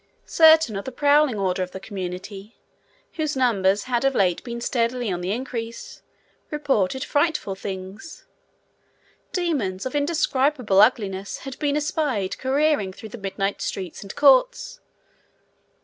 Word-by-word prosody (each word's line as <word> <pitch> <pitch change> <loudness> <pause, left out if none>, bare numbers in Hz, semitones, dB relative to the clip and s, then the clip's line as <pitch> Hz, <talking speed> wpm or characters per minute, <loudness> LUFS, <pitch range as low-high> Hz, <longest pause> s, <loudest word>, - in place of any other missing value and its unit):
Certain 320 -8 +5
of 195 - -5
the 265 - -5
prowling 285 -2 +3
order 185 -2 -1
of 180 0 -4
the 190 - -6
community, 195 +2 -7 0.6
whose 310 -2 -1
numbers 200 -6 +2
had 245 -1 -1
of 270 -1 +2
late 180 -3 +1
been 235 -1 -6
steadily 235 -1 -1
on 180 -1 -3
the 180 +2 -2
increase, 230 -1 -5 0.5
reported 265 -5 0
frightful 295 - 0
things. 190 +8 -8 1.1
Demons 265 - -1
of 260 - -4
indescribable 285 - +2
ugliness 200 -4 +1
had 270 -1 -7
been 290 -1 0
espied 290 - -1
careering 270 -6 +1
through 220 +3 -11
the 240 - -9
midnight 195 0 -3
streets 185 -3 -5
and 195 - -9
courts. 290 - +3
235 Hz, 135 wpm, -23 LUFS, 195-285 Hz, 1.1 s, Certain